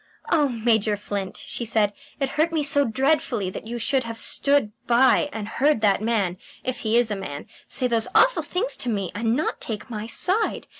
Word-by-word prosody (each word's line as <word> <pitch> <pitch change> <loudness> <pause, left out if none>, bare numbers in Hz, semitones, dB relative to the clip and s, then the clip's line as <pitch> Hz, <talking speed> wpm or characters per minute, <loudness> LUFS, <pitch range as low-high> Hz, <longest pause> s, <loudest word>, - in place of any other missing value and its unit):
"Oh, 300 -4 +3
Major 220 -3 +1
Flint," 200 -2 -5
she - - -4
said, 215 -2 +1 0.3
"it 275 -1 0
hurt 315 +4 +1
me 315 -2 0
so 285 0 +3
dreadfully 245 -5 0
that 220 - -8
you 240 +1 -4
should 260 +3 +1
have 230 -1 -6
stood 280 -1 +2 0.2
by 260 +4 +4
and 220 -4 -5
heard 280 +2 +1
that 200 -2 +3
man 210 -5 0 0.3
if 255 -1 -3
he 220 +1 +1
is 240 -2 +2
a - - 0
man 190 -8 -6 0.2
say 255 - +1
those 230 -2 +2
awful - - +5
things 435 +8 -1
to 250 - -1
me 200 -5 -2
and 225 +2 0
not 305 - -2
take 220 +2 -5
my 215 0 -5
side. 380 - 0
235 Hz, 200 wpm, -24 LUFS, 210-280 Hz, 0.3 s, awful